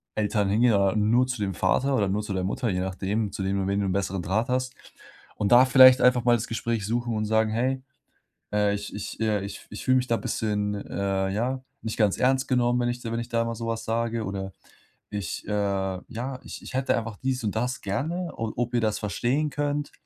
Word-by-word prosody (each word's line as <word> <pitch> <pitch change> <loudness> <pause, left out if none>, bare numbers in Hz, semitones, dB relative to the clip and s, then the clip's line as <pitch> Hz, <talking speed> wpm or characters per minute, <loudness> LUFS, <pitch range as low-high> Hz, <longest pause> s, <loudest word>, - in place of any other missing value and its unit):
Eltern 105 -1 +1
hingehen 115 +3 +4
oder 100 0 +3
nur 115 +4 +3
zu 125 -2 -4
dem 100 -1 -1
Vater 130 +10 +1
oder 100 -4 +1
nur 105 +2 0
zu 105 -1 -4
der 95 -1 -1
Mutter, 110 +5 -1
je 90 -1 -1
nachdem, 100 +3 -2
zu 100 -1 -4
wem 100 +1 0
du 95 - 0
wen 100 +1 0
du 100 - 0
'n 95 - 0
besseren 95 -2 -1
Draht 110 +8 -1
hast. 130 0 0 0.6
Und 100 - 0
da 125 +1 +9
vielleicht 130 0 +8
einfach 125 -1 +4
mal 120 -1 +5
das 115 +2 -3
Gespräch 115 -2 -2
suchen 120 +1 -1
und 110 0 -1
sagen: 110 0 +2
„Hey, 130 +4 0 0.7
äh, 105 -1 +2
ich 100 0 -6
ich, 105 +1 -6
äh 105 -3 +1
ich 100 - -8
ich 105 - -8
fühle 130 0 +4
mich 125 - -1
da 115 - +1
bisschen, 105 -2 -1
äh, 100 -1 -2
ja, 125 +6 -1 0.2
nicht 110 +1 -4
ganz 105 -3 +3
ernst 130 +1 +2
genommen, 125 -1 +2
wenn 120 - +1
ich 120 0 -3
dir 115 -2 -5
wenn 115 - -1
ich 120 - -6
da 115 -1 +1
mal 115 0 -3
so 115 +1 -5
was 115 0 -3
sage.” 115 0 -1
Oder: 95 0 -4 0.6
„Ich, 100 -3 -5
äh, - - -3
ja 100 +5 -2
ich - - -8
ich - - -10
hätte 130 0 +1
einfach 115 -2 -4
dies 130 -2 -2
und 105 0 -2
das 125 +3 -1
gerne, 165 - -2
o 115 -1 -3
ob 120 0 -2
ihr 120 - +2
das 110 -1 0
verstehen 125 +8 0
könnt.“ 145 0 -2
110 Hz, 235 wpm, -26 LUFS, 100-125 Hz, 0.7 s, da